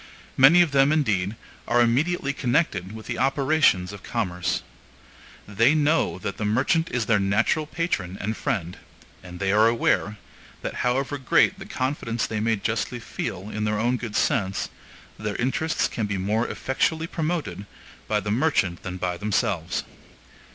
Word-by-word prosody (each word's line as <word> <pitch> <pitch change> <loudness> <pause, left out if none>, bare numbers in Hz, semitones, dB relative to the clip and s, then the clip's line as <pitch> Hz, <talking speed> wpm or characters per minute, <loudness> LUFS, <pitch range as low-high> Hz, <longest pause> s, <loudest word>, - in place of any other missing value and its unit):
Many 160 +7 +7
of 165 - -3
them, 135 +1 +4
indeed, 105 -10 +1 0.3
are 120 - +3
immediately 140 +5 +2
connected 120 - 0
with 110 0 -9
the - - -4
operations 135 -8 +2
of 100 - -9
commerce. 90 -7 -2 0.8
They 115 +8 +3
know 155 - +2
that 100 +2 -5
the - - -3
merchant 135 +10 +1
is 120 -2 -1
their 105 -3 +3
natural 110 +10 +1
patron 100 - -2
and 110 +2 -2
friend; 90 -6 -3 0.4
and 90 -1 -10
they 95 -1 +1
are 105 +2 +5
aware, 115 -2 +1 0.5
that - - -3
however 135 +3 0
great 160 +8 +3
the 195 - -9
confidence 130 - -2
they 110 - -3
may 115 +1 +1
justly 115 +4 -2
feel 100 -3 -5
in 105 - -3
their 105 0 0
own 120 +3 +1
good 115 -3 -6
sense, 100 -10 0 0.5
their 105 -1 -3
interests 135 +6 0
can 110 -3 -3
be 100 -1 -2
more 105 +5 0
effectually 160 +4 -1
promoted 155 - -3 0.4
by 105 - +1
the 105 0 -3
merchant 110 - +1
than 90 -1 -5
by 90 -1 -2
themselves. 100 -4 -1
115 Hz, 160 wpm, -24 LUFS, 100-140 Hz, 0.8 s, Many